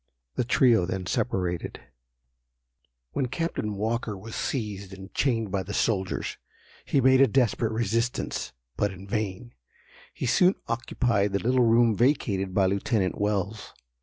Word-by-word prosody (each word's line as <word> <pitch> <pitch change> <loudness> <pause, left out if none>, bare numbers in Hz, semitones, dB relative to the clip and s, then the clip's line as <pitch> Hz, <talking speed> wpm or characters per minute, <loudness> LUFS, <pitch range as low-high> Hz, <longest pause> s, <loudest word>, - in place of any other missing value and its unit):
The - - 0
trio 115 -6 +4
then 95 0 -3
separated. 90 -4 -2 1.3
When 130 - -1
Captain 130 -6 -2
Walker 110 0 -2
was 110 +4 -10
seized 100 -6 -3
and 95 +1 -12
chained 115 -7 0
by 100 -1 0
the 100 +2 -5
soldiers, 95 -4 -1 0.5
he 140 - +2
made 130 0 +5
a 135 - +7
desperate 120 -4 +1
resistance, 115 - -1 0.2
but 105 -1 0
in 95 +1 -11
vain. 110 +3 -3 0.6
He - - -5
soon 185 0 +4
occupied 115 -3 0
the 100 - +1
little 125 +2 +3
room 115 -1 +4
vacated 100 -6 +1
by 95 +1 +3
Lieutenant 100 0 0
Wells. 105 +1 -2
110 Hz, 135 wpm, -27 LUFS, 95-120 Hz, 1.3 s, a